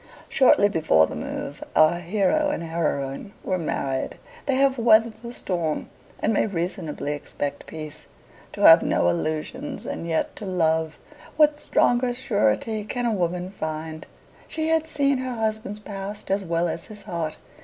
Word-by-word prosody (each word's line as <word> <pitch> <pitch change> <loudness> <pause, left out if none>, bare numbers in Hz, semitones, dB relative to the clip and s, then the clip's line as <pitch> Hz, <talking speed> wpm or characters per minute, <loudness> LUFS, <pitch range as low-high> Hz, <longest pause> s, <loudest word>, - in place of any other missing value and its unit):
Shortly 250 -6 +5
before 115 - +4
the - - -7
move, - - -5
our 155 +2 +5
hero 200 - +1
and 290 - -2
heroine 160 +1 -2
were 185 -1 -1
married. 135 -4 -2 0.3
They 275 - +2
have 270 -1 +3
weathered 225 -1 +5
the 235 +1 -8
storm, 170 -9 -2 0.3
and 225 - +1
may 210 - +2
reasonably 165 -5 -3
expect 145 0 -5
peace. 155 -2 -8 0.5
To - - -6
have - - +9
no 85 - +2
illusions 155 - -3
and 170 - -4
yet 160 -1 -1
to 205 - -6
love 160 -3 +1 0.4
what 300 -1 +5
stronger 245 -3 +2
surety 215 - 0
can 245 +3 -3
a 230 - +2
woman 180 -1 -1
find? 155 -3 -5 0.4
She 315 0 -1
had 320 -1 +2
seen 280 -3 +1
her 255 -1 -3
husband's 220 -2 -2
past 200 -1 -6
as 195 0 +1
well 170 -1 0
as 170 0 -4
his 210 -2 -11
heart. 165 -4 -3
195 Hz, 155 wpm, -24 LUFS, 160-235 Hz, 0.5 s, have